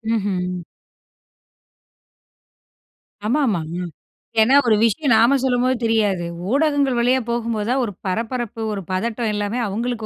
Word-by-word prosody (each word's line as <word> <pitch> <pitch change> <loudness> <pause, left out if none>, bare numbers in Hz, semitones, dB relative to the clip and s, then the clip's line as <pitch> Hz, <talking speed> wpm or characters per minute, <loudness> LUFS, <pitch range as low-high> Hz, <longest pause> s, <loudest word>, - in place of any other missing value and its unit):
ம்ஹ்ம். 180 -3 -2 2.7
ஆமா, 280 +7 +2
ஆமா. 195 -7 0 0.2
ம். 180 - -3 0.6
ஏன்னா 255 +5 +5
ஒரு 220 - +5
விஷயம் 230 +4 +2
நாம 235 +5 +5
சொல்லும்போது 255 0 +2
தெரியாது. 205 -6 +1 0.3
ஊடகங்கள் 285 -3 +2
வழியா 250 +2 +3
போகும்போதுதான் 235 +2 -1
ஒரு 205 - -6
பரபரப்பு 230 +3 -3
ஒரு 195 - -4
பதட்டம் 220 +3 -1
எல்லாமே 205 +4 -2
அவங்களுக்கு 225 +2 -3
230 Hz, 115 wpm, -21 LUFS, 205-250 Hz, 2.7 s, ஏன்னா